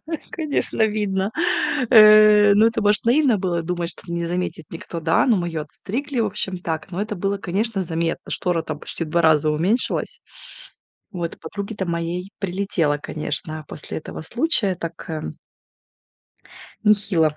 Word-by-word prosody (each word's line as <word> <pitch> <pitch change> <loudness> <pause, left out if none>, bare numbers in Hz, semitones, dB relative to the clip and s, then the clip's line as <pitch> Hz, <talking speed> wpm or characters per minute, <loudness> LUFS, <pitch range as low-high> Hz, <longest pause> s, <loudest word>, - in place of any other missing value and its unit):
Ну, 325 - -2 0.2
конечно 290 -8 +1
видно, 205 -2 -1 0.6
э, 215 -2 +8
ну, 215 +2 +5
это 225 -1 0
может 205 +1 +2
наивно 250 -2 +3
было 175 -3 -1
думать, 175 0 -3
что 170 - -9
не 170 0 -2
заметит 175 -3 -3
никто, 165 0 -7
да, 165 - +2
но 230 -5 +4
мы 175 -1 -1
её 160 -2 -3
отстригли, 255 - -4
в 220 - +2
общем 190 -2 -1
так, 160 -2 -4
но 180 - -4
это 210 -1 -4
было, 195 +2 -1
конечно, 195 +3 -1
заметно. 165 -1 -3
Штора 175 -3 0
там 155 -1 -5
почти 165 - -5
в - - -9
2 170 +1 +2
раза 155 -1 +4
уменьшилась. 180 +11 -1 0.9
Вот, 170 -2 -4
подруге-то 200 +3 -5
моей 170 +3 -3
прилетело, 180 -6 0
конечно, 155 +1 -4
после 150 - -6
этого 155 - -8
случая, 235 - +1
так, 170 -1 -7
э. 160 -1 -4 1.6
Нехило 195 -7 +3
185 Hz, 155 wpm, -22 LUFS, 165-210 Hz, 1.6 s, э